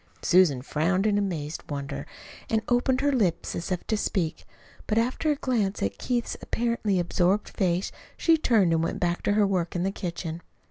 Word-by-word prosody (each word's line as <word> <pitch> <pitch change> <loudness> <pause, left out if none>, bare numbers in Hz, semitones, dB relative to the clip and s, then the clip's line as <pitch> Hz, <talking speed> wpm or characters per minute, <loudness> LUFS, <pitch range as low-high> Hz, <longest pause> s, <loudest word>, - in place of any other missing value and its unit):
Susan 170 -8 +4
frowned 175 +8 0
in 205 -1 +3
amazed 165 -6 -3
wonder, 140 - -5 0.4
and 220 -1 +1
opened 255 +2 +2
her 285 0 +2
lips 200 -11 0
as 170 - -4
if 180 - -2
to 220 - 0
speak. 180 -5 -2 0.4
But 215 - 0
after 250 +7 +1
a 300 - +3
glance 225 -8 -1
at 100 0 -2
Keith's 240 -2 -1
apparently 230 -5 0
absorbed 180 +3 +1
face, 180 -1 0 0.3
she 330 - +4
turned 220 - +3
and 165 - +2
went - - -2
back 175 -2 0
to 205 - +1
her 210 0 +4
work 185 -3 -1
in 175 - 0
the 195 - 0
kitchen. 170 -3 -5
190 Hz, 185 wpm, -26 LUFS, 170-225 Hz, 0.4 s, Susan